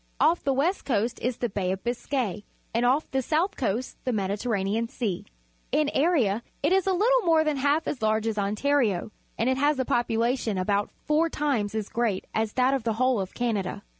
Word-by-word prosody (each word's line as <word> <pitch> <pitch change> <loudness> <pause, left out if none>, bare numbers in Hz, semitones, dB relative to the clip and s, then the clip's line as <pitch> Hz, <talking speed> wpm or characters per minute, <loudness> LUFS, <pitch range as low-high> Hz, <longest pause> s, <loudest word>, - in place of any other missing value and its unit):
Off 335 +3 +3
the 275 - +1
west 300 +9 +1
coast 235 -2 0
is 250 -1 -1
the 240 - -1
Baij 190 -2 -1
of 190 - -7
Biscay, 240 -3 -2 0.3
and 235 +2 +2
off 275 +5 +1
the 265 - +1
south 325 +9 0
coast 240 0 -2
the 255 - 0
Mediterranean 205 +1 -1
Sea. 215 -6 -3 0.5
In 300 -1 +2
area 265 - +2 0.2
it 295 - +2
is 385 0 +2
a - - +4
httle 450 +6 +3
more 325 -2 +4
than 305 -3 0
h - - -4
alf 295 +3 +2
as 260 - -3
large 220 0 +1
as 225 -1 0
Ontari 215 +1 +1
o, 215 - -9 0.3
and 230 - 0
it 260 0 +2
has 290 +1 +2
a 260 - 0
population 235 -2 0
about 200 +2 0 0.2
four 310 +2 +2
times 250 -10 -1
as 215 -2 -2
great 230 -5 -1
as 220 -1 -1
that 255 +1 +3
of 270 - 0
the 225 0 -1
whole 255 +1 +2
of 190 -1 -5
Canada. 220 -6 -2
240 Hz, 210 wpm, -26 LUFS, 215-285 Hz, 0.5 s, a